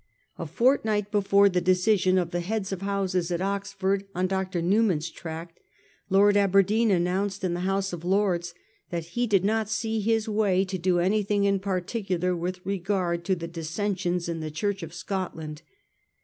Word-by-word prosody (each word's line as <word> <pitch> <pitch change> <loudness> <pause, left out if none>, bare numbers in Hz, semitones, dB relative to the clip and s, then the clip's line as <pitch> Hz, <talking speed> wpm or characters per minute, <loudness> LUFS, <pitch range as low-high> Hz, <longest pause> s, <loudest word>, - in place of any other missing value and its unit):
A - - -4
fortnight 220 -5 +1
before 200 -1 +4
the 180 -2 +1
decision 185 +1 +3
of 175 -2 0
the 175 - -1
heads 195 +2 -3
of 195 -1 -4
houses 195 -3 -1
at 170 - 0
Oxford 195 0 -1
on 180 +1 +1
Dr. 185 -1 -1
Newman's 175 -3 +1
tract, 165 +1 -8 0.5
Lord 200 +1 +5
Aberdeen 200 +3 +3
announced 190 +2 0
in 180 -2 0
the 175 - -2
House 195 +1 -1
of 170 -1 -6
Lords 180 -2 0 0.3
that 170 -2 -3
he 240 0 0
did 195 -3 +2
not 220 0 +1
see 220 0 -1
his 225 +1 +1
way 205 -3 +2
to 185 0 -4
do 180 +1 +2
anything 200 +3 +1
in 200 -1 +2
particular 185 -1 -1
with 180 +2 -4
regard 185 -3 -1
to 190 - +2
the 170 -1 -6
dissensions 175 +2 -2
in 165 -1 -3
the 155 -1 -4
Church 195 +6 -2
of 165 -1 -7
Scotland. 165 -4 -5
190 Hz, 170 wpm, -26 LUFS, 175-200 Hz, 0.5 s, Lord